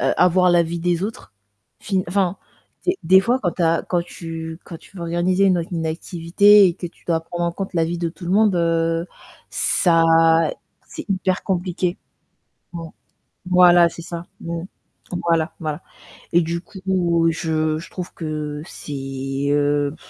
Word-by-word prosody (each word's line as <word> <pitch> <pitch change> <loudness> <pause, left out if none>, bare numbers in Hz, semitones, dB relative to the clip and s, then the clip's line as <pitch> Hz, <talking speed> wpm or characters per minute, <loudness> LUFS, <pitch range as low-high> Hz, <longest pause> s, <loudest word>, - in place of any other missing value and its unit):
heu, - - +2
avoir 180 0 +4
l'avis 170 -1 +2
des 175 +1 0
autres. 210 - -6 0.5
Enfin 190 -2 0
enfin, 190 0 0 0.5
des 365 +1 +2
des 190 +3 +6
fois 240 +6 +1
quand 175 -4 0
tu 180 - -3
as, 165 0 +2
quand 175 -2 +1
tu 165 -1 -7
quand 165 - -9
tu 195 - -18
veux 175 - -6
organiser 175 +3 +1
une 185 -2 +3
auc 170 - -5
une 165 -2 -2
activité 180 +5 +4
et 175 - 0
que 175 - -6
tu 170 - -16
dois 165 -2 +1
prendre 175 +1 -4
en 170 - -1
compte 190 +1 -6
l'avis 165 0 0
de 170 -1 -1
tout 175 +2 -11
le 175 - -3
monde, 210 0 +4
heu, 165 0 +1 0.4
ça 165 -2 +2 0.8
c'est - - -9
hyper 185 -1 0
compliqué. 180 -1 -2 0.8
Mmh 165 -1 -6 0.6
Voilà, 175 -1 +6
c'est 170 - -10
ça. 170 0 -7
Mmh. 170 0 -4 0.7
Voilà, 165 -1 +2
voilà 155 0 -4 0.5
et 175 - +5
du 170 +1 -2
coup, 180 -3 0
je 155 -1 -1
je 165 - -11
trouve 180 -2 -7
que 150 -2 -4
c'est, 135 -2 -5
heu, 145 0 +1
170 Hz, 165 wpm, -21 LUFS, 165-180 Hz, 0.8 s, des